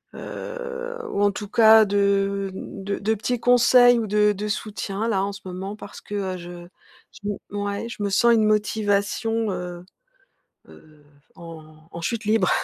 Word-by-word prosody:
heu, 485 -1 -6
ou 200 - -1
en 205 - +4
tout 205 +1 -6
cas 220 0 +6
de 200 -1 +1
de 195 +1 -5
de 215 +2 0
petits 240 +3 -2
conseils 245 0 +5
ou 220 - -2
de 210 0 +3
de 205 +2 -4
soutien, 210 0 -3
là, 195 -4 +1
en 200 - -2
ce 200 - -10
moment, 190 +3 -6
parce 200 - -11
que, 205 - -7
heu, 190 -2 -2
je 175 0 -10 0.6
je 205 - -2
m 205 - -3
ouais, 205 +2 -3
je 215 - -8
me 200 - 0
sens 235 +4 +4
une 220 -1 +3
motivation, 210 +1 0
heu 180 -1 -6 0.8
heu, 155 -1 -18 0.3
en 155 -2 -13
en 170 - -7
chute 225 +5 -3
libre. 215 -3 +2
205 Hz, 170 wpm, -23 LUFS, 195-220 Hz, 0.8 s, cas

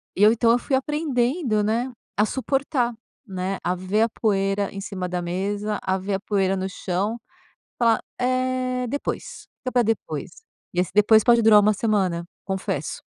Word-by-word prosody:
eu 210 +3 +6
então, 230 0 +3
eu 240 - +3
fui 270 - 0
aprendendo, 265 -4 0
né, 230 +5 0 0.3
a 210 - +4
suportar, 265 0 -1 0.3
né, 190 -1 -3
a 180 +1 +1
ver 185 +4 +1
a 230 - +1
poeira 200 -2 0
em 195 - -7
cima 185 -2 -4
da 180 -1 -2
mesa, 200 +4 -2
a 190 +1 0
ver 195 +1 -2
a 195 - -2
poeira 195 -2 0
no 190 0 -2
chão, 195 +5 -2 0.6
falar: 230 -2 +3 0.2
"É, 255 0 0
depois, 285 +4 -5
fica 255 - -4
pra 245 -2 +3
depois.", 225 +1 -2 0.4
e 175 - 0
esse 180 - 0
depois 210 +1 +5
pode 235 -1 +5
durar 215 -1 +8
1 210 +1 +4
semana, 195 -6 0 0.2
confesso. 190 0 -3
210 Hz, 170 wpm, -24 LUFS, 195-245 Hz, 0.6 s, durar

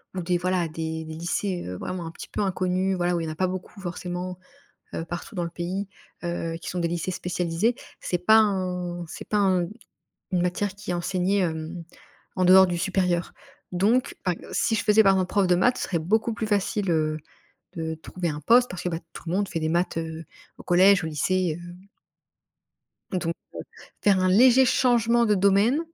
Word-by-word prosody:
ou 185 - -2
des 175 +1 +1
voilà 180 -1 0
des 160 0 -4
des 160 - -7
lycées, 175 +3 -2
heu, 90 - -5
vraiment 180 -2 -5
un 165 - -6
petit - - -10
peu - - -3
inconnus. 185 0 0
Voilà 175 0 +1
où 170 - -1
il 165 - -3
y - - -3
en - - -7
pas 185 +3 +1
beaucoup 185 +2 -6
forcément, 180 0 -5 0.6
heu, 165 - -3
partout 175 +6 -7
dans 175 - -1
le 170 - -5
pays, 185 +4 -4 0.4
heu, 170 -1 -3
qui - - -7
sont 180 - -3
des 170 - +1
lycées 175 +2 -2
spécialisés. 180 +6 -1 0.2
C'est 180 - -1
pas 220 +5 +6
un 180 -4 0
c'est - - -9
pas 210 - 0
un 185 -3 +2 0.7
une 180 - +2
matière 185 +2 -1
qui 200 -3 -5
est - - -1
enseignée, 185 +3 0
hem, 165 0 -3 0.5
en 185 - +2
dehors 190 +1 +8
du 175 -1 -2
supérieur, 180 -1 0 0.4
donc 215 +8 +2
par 180 -2 +1
ex - - -13
si 225 - +1
je 205 - -2
faisais 215 +1 +6
par 195 0 +6
exemple 185 -1 +1
prof 200 -2 +2
de 180 - +4
maths, 245 +7 +3
ce - - -4
serait 170 - -1
beaucoup 220 +7 +1
plus 220 - -3
facile, 205 -2 0
heu, 155 -1 +1 0.6
de 160 -1 -3
trouver 175 +2 -4
un 150 0 -5
poste, 245 - +5
parce 180 - -6
que 180 - -1
bah, 165 - -2 0.2
tout - - -9
le 170 - -2
monde 200 0 0
fait 165 - -3
des 155 - 0
maths, 175 0 0
heu, 160 0 -5 0.3
au - - -10
collège, 190 +1 +5
au - - -2
lycée, 175 +1 0
heu 175 0 -9 1.4
donc 180 -2 -2
heu, 165 - +1 0.7
faire 195 -2 +4
un 185 - +2
léger 250 +7 +6
changement 240 -2 +3
de 210 - +3
domaine, 200 - +3
180 Hz, 210 wpm, -25 LUFS, 170-200 Hz, 1.4 s, dehors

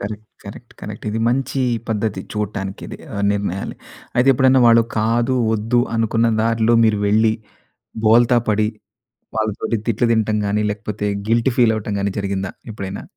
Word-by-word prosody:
Correct, 105 +1 -6 0.2
correct, 115 +4 -11
correct. 105 0 -8
ఇది 110 - -2
మంచి 135 +2 -1 0.3
పద్ధతి 105 -3 -1
చూడటానికి 100 -2 -4
ఇది - - -8 0.4
నిర్ణయాలు. 100 -2 -3 0.4
అయితే 125 +2 +3
ఎప్పుడైనా 130 0 +4
వాళ్ళు 115 0 +6 0.2
కాదు, 115 +3 +1 0.2
వద్దు 115 +3 +1 0.2
అనుకున్న 115 +1 +2
దారిలో 115 0 +2
మీరు 110 -2 +2
వెళ్లి 110 +1 +3 0.7
బోల్తా 120 +2 +5
పడి 105 0 +2 0.7
వాళ్ళతోటి 110 +1 -1
తిట్లు 115 +1 +1
తినటం 110 -1 +1
గాని 105 +1 0
లేకపోతే 105 0 -4 0.2
గిల్ట్ 115 +3 +2
ఫీల్ 120 -3 +4
అవ్వడం 105 -1 -4
గాని 100 0 0
జరిగిందా 100 -1 -2 0.2
ఎప్పుడైనా? 100 -2 -6
110 Hz, 140 wpm, -20 LUFS, 105-115 Hz, 0.7 s, వాళ్ళు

